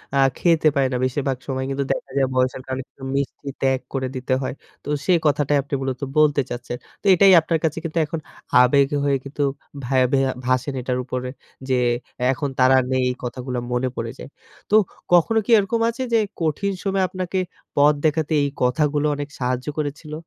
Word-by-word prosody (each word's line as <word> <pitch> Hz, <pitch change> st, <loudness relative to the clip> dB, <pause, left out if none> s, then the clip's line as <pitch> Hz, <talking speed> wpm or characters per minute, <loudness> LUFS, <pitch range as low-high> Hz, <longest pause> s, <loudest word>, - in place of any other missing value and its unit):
আ -, -, +3 dB, 0.2 s
খেতে 165 Hz, -3 st, +3 dB
পায় 135 Hz, -1 st, +3 dB
না। 125 Hz, -, -1 dB
বেশিরভাগ 130 Hz, 0 st, -1 dB
সময় 130 Hz, -1 st, -2 dB
কিন্তু 135 Hz, +1 st, -1 dB
দেখা -, -, -7 dB
যায় 135 Hz, -, +3 dB
বয়সের 130 Hz, 0 st, +1 dB
কারণে 130 Hz, 0 st, -3 dB
কিন্তু 135 Hz, -, -16 dB
মিষ্টি 140 Hz, 0 st, -3 dB
ত্যাগ 130 Hz, -1 st, +2 dB
করে 130 Hz, -1 st, -1 dB
দিতে 130 Hz, +1 st, -1 dB
হয়। 130 Hz, -, -3 dB, 0.3 s
তো -, -, -7 dB, 0.2 s
সেই 180 Hz, -2 st, +4 dB
কথাটাই 145 Hz, -1 st, +2 dB
আপনি 140 Hz, +1 st, -12 dB
মূলত 130 Hz, -1 st, -3 dB, 0.2 s
বলতে 150 Hz, -2 st, +4 dB
চাচ্ছেন। 120 Hz, 0 st, -5 dB, 0.2 s
তো -, -, -30 dB
এটাই 190 Hz, +2 st, +6 dB
আপনার 160 Hz, 0 st, 0 dB
কাছে 160 Hz, -1 st, 0 dB
কিন্তু 165 Hz, 0 st, -4 dB
এখন 160 Hz, +2 st, -4 dB, 0.4 s
আবেগ 135 Hz, +2 st, +4 dB, 0.2 s
হয়ে 140 Hz, -1 st, +2 dB
কিন্তু 145 Hz, +1 st, -3 dB, 0.4 s
ভ্যাবে 130 Hz, +1 st, +2 dB, 0.3 s
ভাসেন 130 Hz, +2 st, 0 dB
এটার 125 Hz, 0 st, -2 dB
উপরে। 125 Hz, 0 st, -4 dB, 0.4 s
যে, 130 Hz, -, +3 dB, 0.6 s
এখন 140 Hz, +2 st, -2 dB
তারা 130 Hz, +1 st, +6 dB
নেই 130 Hz, 0 st, +2 dB
এই 125 Hz, -, -2 dB
কথাগুলো 125 Hz, +1 st, -4 dB
মনে 125 Hz, +1 st, 0 dB
পড়ে 115 Hz, 0 st, -4 dB
যায়। -, -, -9 dB, 0.4 s
তো 210 Hz, -, +4 dB, 0.4 s
কখনো 175 Hz, +6 st, +5 dB
কি -, -, -14 dB
এরকম 210 Hz, +3 st, +1 dB
আছে 235 Hz, +3 st, -4 dB
যে, -, -, +6 dB, 0.2 s
কঠিন 165 Hz, +5 st, 0 dB
সময়ে 195 Hz, -1 st, +1 dB
আপনাকে 185 Hz, 0 st, -3 dB, 0.4 s
পথ 145 Hz, +1 st, +5 dB
দেখাতে 155 Hz, 0 st, +1 dB
এই 140 Hz, -, 0 dB
কথাগুলো 145 Hz, +4 st, +1 dB
অনেক 145 Hz, 0 st, -5 dB
সাহায্য 125 Hz, +1 st, -2 dB
করেছিল? 150 Hz, +1 st, -4 dB
140 Hz, 185 wpm, -22 LUFS, 130-155 Hz, 0.6 s, এটাই